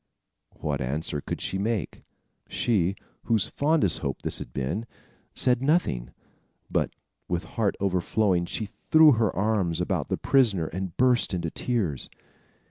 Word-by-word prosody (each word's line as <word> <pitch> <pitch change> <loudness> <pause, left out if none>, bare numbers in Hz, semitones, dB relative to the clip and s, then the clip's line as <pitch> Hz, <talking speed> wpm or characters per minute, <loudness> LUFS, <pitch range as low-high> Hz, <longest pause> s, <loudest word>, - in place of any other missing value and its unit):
What 70 -3 -2
answer 75 +3 -2
could - - -5
she 95 - -2
make? 105 -5 -2 0.5
She, 100 -5 +1 0.3
whose 110 -5 +2
fondest 145 - +2
hope 70 -2 -4
this - - +2
had - - -8
been, 70 - -3 0.5
said 125 -1 +2
nothing; 135 - +1 0.6
but, - - +1 0.4
with 90 +1 -1
heart 110 -4 -1
overflowing, 95 -1 +1
she 110 - -3
threw 150 +9 +5
her 115 -4 +2
arms 95 -4 +1
about - - -1
the - - 0
prisoner 110 -11 +3
and 90 +1 -5
burst 125 -6 +3
into 85 -2 -3
tears. 100 - -2
100 Hz, 135 wpm, -26 LUFS, 85-115 Hz, 0.6 s, threw